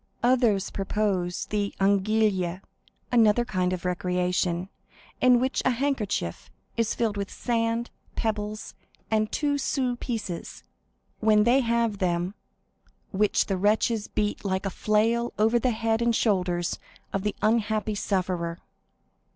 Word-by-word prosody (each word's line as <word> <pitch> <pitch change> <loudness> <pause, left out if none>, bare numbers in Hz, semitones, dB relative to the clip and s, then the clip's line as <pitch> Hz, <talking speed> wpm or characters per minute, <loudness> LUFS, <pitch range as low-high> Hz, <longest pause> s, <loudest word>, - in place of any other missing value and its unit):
Others 235 -6 +3
proposed 195 -3 -1
the 205 -1 -1
anguille, 195 -2 +2 0.5
another 235 -1 +4
kind 185 -6 0
of 185 -1 -4
recreation, 180 0 0 0.5
in 250 -1 +6
which 260 +2 0
a - - +3
handkerchief 235 - -2 0.3
is 230 -1 0
filled 220 -3 0
with 200 -1 -3
sand, 230 0 -1 0.2
pebbles, 215 -1 -3 0.4
and 215 -1 +1
two 285 -1 0
sous 260 -3 0
pieces, 210 -8 -5 0.6
when 215 -1 +4
they 240 +4 +4
have 230 -4 +1
them, 175 0 0 0.8
which 210 +1 +2
the 195 - -1
wretches 210 +2 +1
beat 210 -1 -2
like 190 -1 -1
a 195 - -1
flail 225 +4 +1
over 225 +3 +3
the 255 - +1
head 225 0 0
and 235 -1 +2
shoulders 180 -6 0 0.3
of 195 - 0
the 210 +1 -2
unhappy 215 -1 +1
sufferer. 180 -4 -1
210 Hz, 125 wpm, -26 LUFS, 190-230 Hz, 0.8 s, in